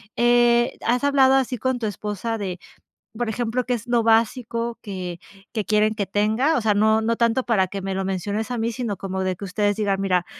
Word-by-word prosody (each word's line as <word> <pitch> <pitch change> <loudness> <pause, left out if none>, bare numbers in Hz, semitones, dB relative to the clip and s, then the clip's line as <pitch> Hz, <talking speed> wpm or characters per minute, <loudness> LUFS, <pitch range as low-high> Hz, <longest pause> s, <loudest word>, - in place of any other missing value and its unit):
Eh, 240 0 +3
¿has 245 +3 +1
hablado 270 -2 +4
así 255 -3 0
con 260 +1 0
tu 235 - -4
esposa 210 +2 -3
de, 185 -3 -4 0.6
por 240 -1 -1
ejemplo, 240 +2 -2
qué 250 - 0
es 230 -2 -4
lo 240 -1 +2
básico 230 +1 +1
que 180 -4 -6 0.3
que 215 -3 -2
quieren 215 0 +2
que 205 -2 -1
tenga? 220 +10 +1
O - - 0
sea, 215 -1 +2
no 220 +2 +3
no 230 +1 0
tanto 235 +2 +2
para 200 -6 +2
que 195 +1 -6
me 195 0 -2
lo 190 0 -2
menciones 200 +4 -2
a 245 - -2
mí, 230 +1 -1
sino 235 -3 -3
como 190 0 -3
de 185 -1 -1
que 200 - -7
ustedes 205 +2 0
digan: 200 -2 0
"Mira, 180 -3 +1
220 Hz, 220 wpm, -23 LUFS, 200-240 Hz, 0.6 s, hablado